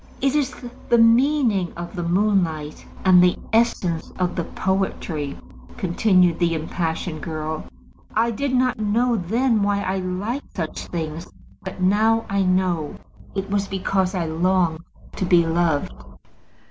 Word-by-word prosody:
"It 275 0 +1
is 285 -3 +1 0.4
the 235 - +5
meaning 230 - +3
of 175 +3 -7
the 175 - -3
moonlight, 170 -4 0 0.2
and 185 -1 +7
the 180 0 +3 0.2
essence 190 -8 +1
of 180 -1 -1
the 170 - -2
poetry," 185 -6 -2 0.4
continued 180 -2 +2
the 170 -2 +2
impassioned 160 0 -3
girl. 155 0 -4 0.5
"I 230 +2 +2
did 275 +5 -2
not 250 -3 +1
know 230 +3 +1
then 225 +4 +1
why 200 0 +1
I 190 +1 -1
liked 195 +9 -4
such 160 -4 -4
things, 160 0 -5 0.4
but 190 0 -7
now 220 +4 +3
I 200 0 +2
know. 185 -4 0 0.4
It 195 0 -3
was 200 -1 0
because 190 0 -1
I 175 -2 -1
longed 170 0 +1 0.4
to 190 - -1
be 175 -2 +4
loved." 165 - 0
185 Hz, 140 wpm, -22 LUFS, 170-215 Hz, 0.5 s, and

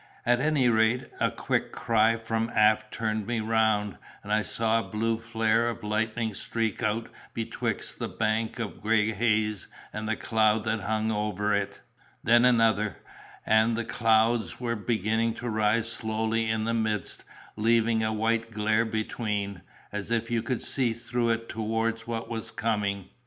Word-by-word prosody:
At 120 0 +3
any 145 -2 +2
rate, 115 +2 +3 0.2
a - - +3
quick - - -1
cry 115 0 +2
from 115 0 -2
aft 110 0 +3
turned 110 -2 -2
me 120 -1 0
round, 110 -5 +1 0.2
and 105 - -2
I 110 - +3
saw 115 +1 +1
a - - -6
blue 115 +1 0
flare 115 0 +1
of 115 - -6
lightning 110 +1 -1
streak 110 0 -2
out 110 +2 0 0.3
betwixt 115 - -3
the - - -2
bank 110 +1 -1
of 115 -3 -5
gray 110 0 +2
haze 105 -2 0 0.3
and 110 0 -4
the 110 - +1
cloud 110 -1 +2
that 110 0 0
hung 110 +2 -1
over 105 -1 0
it—then 115 +3 0
another, 115 -4 +3 0.5
and 110 +1 +3
the 115 - -2
clouds 115 0 +2
were 120 -1 -1
beginning 110 +1 0
to 120 - -6
rise 110 +1 +1
slowly 110 0 -1
in 110 0 0
the 115 - 0
midst, 110 -2 -1 0.3
leaving 115 +1 +2
a 110 0 0
white 115 +1 0
glare 110 +1 +1
between, 105 -3 -3 0.3
as 105 0 -4
if 115 0 -1
you 115 -1 +1
could 120 +1 -2
see 125 -4 0
through 120 +1 -1
it 115 0 -1
towards 115 +1 -2
what 115 -1 -3
was 115 -1 -4
coming. 105 -4 -1
110 Hz, 160 wpm, -27 LUFS, 110-115 Hz, 0.5 s, At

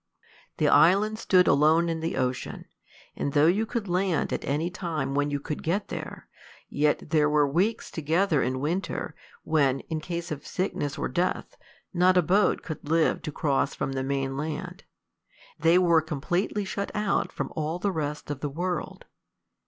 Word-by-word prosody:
The - - +2
island 205 +6 +4
stood 185 -5 +4
alone 160 +4 +4
in 165 -1 -2
the 165 +1 -3
ocean; 130 0 -2 0.5
and 140 - -2
though 145 0 +5
you 200 +7 +2
could 230 -4 -3
land 180 -2 0
at - - -3
any 155 +5 -1
time 155 -7 -3
when 145 +1 +1
you 145 0 -2
could 150 +1 -5
get 195 +6 -1
there, - - -7 0.4
yet 150 +1 0
there 150 -2 +3
were 150 -1 +3
weeks 185 +11 0
together 160 0 +1
in 130 +1 -1
winter, 170 +8 -2 0.3
when, 140 -4 +2
in 160 - -1
case 170 +1 -5
of 150 - -5
sickness 180 -6 -3
or - - -1
death, 175 +8 -2 0.4
not 185 +1 +4
a 180 - +5
boat 195 +6 +2
could 155 -2 -7
live 165 0 +2
to 150 - -5
cross 140 -1 0
from - - -2
the 135 0 -2
main 135 0 -2
land; 150 +2 -5 0.7
they 165 +3 +5
were 170 -3 +4
completely 175 +7 -2
shut 200 +1 -3
out 210 -1 0
from - - -5
all 155 +2 -2
the 200 +2 -1
rest 150 -3 -4
of 145 - -4
the 145 - -3
world. 175 +3 -4
160 Hz, 175 wpm, -27 LUFS, 145-180 Hz, 0.7 s, though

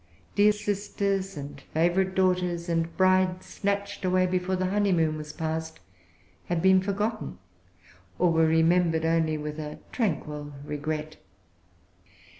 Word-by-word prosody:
Dear 205 +1 +5
sisters, 200 -2 -2
and 140 0 -7
favorite 180 +3 +2
daughters, 180 -2 +1
and 165 -1 -1
brides 185 -1 +3
snatched 200 0 -3
away 185 0 +3
before 185 +1 0
the 185 0 -1
honeymoon 180 -6 +2
was 150 -1 -7
passed, 160 0 -4 0.7
had 175 -1 -1
been 190 +2 +5
forgotten, 205 - -2 0.8
or 180 -1 +3
were 160 0 +4
remembered 160 0 +3
only 160 -1 +2
with 150 +1 -5
a 150 -1 -6
tranquil 150 - -2
regret. 155 +1 -4
175 Hz, 120 wpm, -27 LUFS, 160-190 Hz, 0.8 s, Dear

